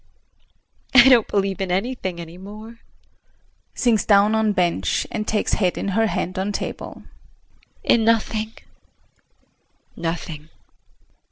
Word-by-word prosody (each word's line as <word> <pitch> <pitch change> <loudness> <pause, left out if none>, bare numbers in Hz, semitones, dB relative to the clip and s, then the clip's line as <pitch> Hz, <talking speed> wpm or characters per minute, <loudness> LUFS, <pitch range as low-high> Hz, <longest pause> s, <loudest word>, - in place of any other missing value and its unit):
I 255 +1 +9
don't 240 -4 +5
believe 195 -2 -1
in 190 - -2
anything 190 -2 -2
any 170 +1 -9
more. 215 +4 -11 1.0
[Sinks 225 -5 +2
down 205 +1 +4
on 220 -1 +2
bench, 175 - 0
and 215 -1 -3
takes 215 - 0
head 185 -4 +1
in - - -2
her 225 +3 +2
hand 185 -3 -3
on 195 +2 -1
table.] - - -6 0.8
In 230 - +3
nothing 220 -1 +1 1.4
nothing! 165 -2 -5
205 Hz, 115 wpm, -22 LUFS, 185-220 Hz, 1.4 s, I